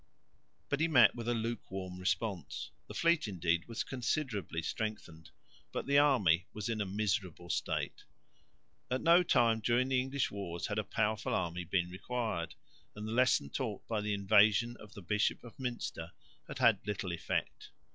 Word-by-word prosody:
But 140 - -1
he 160 - +3
met 120 -9 +6
with 120 -1 -6
a 120 - +1
luke 115 0 -3
warm 95 -1 -6
response. 95 0 -2 0.2
The - - -9
fleet 170 -5 +2
indeed 85 -3 0
was 115 -1 -3
considerably 120 - -2
strengthened, 85 -5 -5 0.4
but - - -3
the 140 +1 +5
army 105 - +4
was 105 +1 -4
in 110 -2 -1
a 100 - -1
miserable 95 -4 -2
state. - - -2 0.8
At 130 +1 -1
no 170 +2 +6
time 115 -9 +3
during 120 +4 +2
the 130 -1 +3
English 135 +1 -1
wars 85 -4 -4
had 105 0 -1
a - - 0
powerful 110 0 0
army 85 +1 -2
been 90 0 0
required, 100 -3 -3 0.4
and 105 +1 -6
the - - -4
lesson 125 - +3
taught - - -4
by 110 -2 -1
the 105 0 -1
invasion 105 +3 +4
of 105 -2 -14
the 100 - -9
Bishop 105 +4 0
of 120 - -12
Münster 120 -10 -4 0.4
had - - -7
had - - +3
little 95 -3 -2
effect. 85 - -3
105 Hz, 170 wpm, -33 LUFS, 95-120 Hz, 0.8 s, met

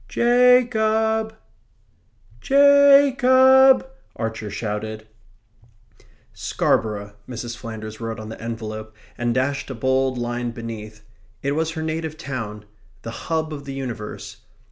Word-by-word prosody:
"Ja 250 +1 +5
cob! 220 -1 0 1.1
Ja 280 0 +6
cob!" 260 +1 +6 0.3
Archer 110 -2 -4
shouted. 110 +1 -5 1.3
"Scarborough," 105 -2 -1 0.2
Mrs. 120 -1 -6
Flanders 110 -2 -8
wrote 115 0 -4
on 110 0 -8
the 110 - -9
envelope, 110 -1 -6 0.2
and 120 0 -1
dashed 140 +2 -1
a 135 - -5
bold 130 +1 0
line 120 0 -3
beneath; 110 -2 -8 0.4
it 140 - 0
was 160 +2 -1
her 160 -1 -4
native 160 0 -4
town; 110 -8 -6 0.4
the 115 - -6 0.2
hub 160 -1 -1
of 140 -1 -8
the 135 - -6
universe. 120 -6 -6
130 Hz, 120 wpm, -22 LUFS, -, 1.3 s, Ja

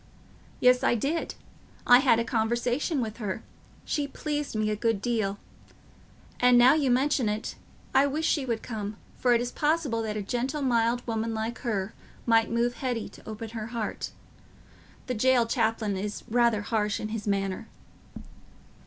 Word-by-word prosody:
"Yes, 250 0 +5
I - - +3
did. 285 +8 -2 0.5
I 245 0 +8
had 255 -4 +4
a 230 - +1
conversation 240 +6 0
with 220 -2 -4
her—she 225 +6 -5
pleased 295 -2 -3
me 215 0 +1
a - - 0
good 225 -1 0
deal. 215 -3 -1 1.0
And 250 0 +6
now 245 +3 +7
you 295 -4 +2
mention 260 -2 +2
it, 210 +2 -3 0.4
I 275 +1 +5
wish 305 +3 -1
she 295 -3 +2
would 230 -3 -2
come, 215 -2 -5 0.2
for 245 -1 +4
it 235 - +2
is 245 0 -3
possible 295 -7 0
that 215 -1 -3
a 210 - -3
gentle 260 +7 -2
mild 240 -1 +1
woman 225 -1 -2
like 225 +2 -3
her 210 -4 -2 0.3
might 225 -1 +4
move 235 +1 0
Hetty 245 -4 -2
to - - -13
open 220 +1 -6
her 220 -2 -5
heart. 230 -2 -4 1.0
The 250 - -2
jail 250 +1 +3
chaplain 225 -3 0
is 205 +2 -4
rather 235 -2 +2
harsh 210 -2 0
in 215 - -4
his 215 -1 -5
manner." 195 -2 -1
235 Hz, 160 wpm, -27 LUFS, 215-250 Hz, 1.0 s, I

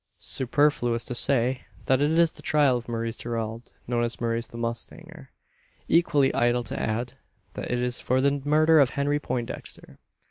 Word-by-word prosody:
Superfluous 125 -3 +1
to - - -5
say 125 0 +1 0.2
that 130 +1 +2
it 145 - +3
is 165 0 +3
the - - -13
trial 145 -4 +3
of 120 0 -5
Maurice 115 0 -3
Gerald 115 0 -4
known 120 -1 0
as 120 0 -3
Maurice 115 0 -1
the 115 - -11
mustanger. 135 +7 -5 0.6
Equally 150 -5 +3
idle 120 0 +2
to - - -5
add, 115 +3 -3 0.4
that - - -6
it 125 - 0
is 125 0 -2
for 130 +1 +1
the 140 +1 +1
murder 155 +2 +4
of 135 -3 +5
Henry 145 +1 +1
Poindexter. 120 -4 -5
125 Hz, 170 wpm, -26 LUFS, 120-145 Hz, 0.6 s, of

